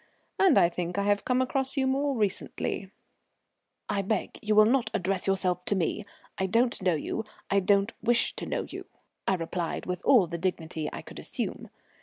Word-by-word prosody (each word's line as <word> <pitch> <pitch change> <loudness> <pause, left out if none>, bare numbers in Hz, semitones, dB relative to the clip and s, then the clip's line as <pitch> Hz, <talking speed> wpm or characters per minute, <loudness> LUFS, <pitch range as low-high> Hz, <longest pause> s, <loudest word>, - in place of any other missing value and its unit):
And 385 -2 +6
I - - +7
think 175 +1 -4
I 200 - +1
have 205 0 +1
come 255 0 +2
across 265 +2 -2
you 265 - +2
more 275 0 +1
recently." 200 -2 -2 1.0
"I 205 -1 0
beg 200 +1 -2
you 215 0 +1
will 215 0 +8
not 240 0 +2
address 185 +1 -1
yourself 185 -2 +1
to 205 - +1
me. 190 +3 -1 0.3
I 190 - +1
don't 235 +3 +2
know 180 -3 +2
you, 220 +8 -3 0.3
I 200 - +5
don't 200 +2 +2
wish 235 +1 +2
to - - -4
know - - -1
you," - - -8 0.4
I 190 - +3
replied, 170 0 -3
with 180 0 -3
all 235 -9 +6
the 170 0 -5
dignity 160 -3 -2
I - - -7
could - - -10
assume. - - -4
200 Hz, 190 wpm, -28 LUFS, 180-230 Hz, 1.0 s, will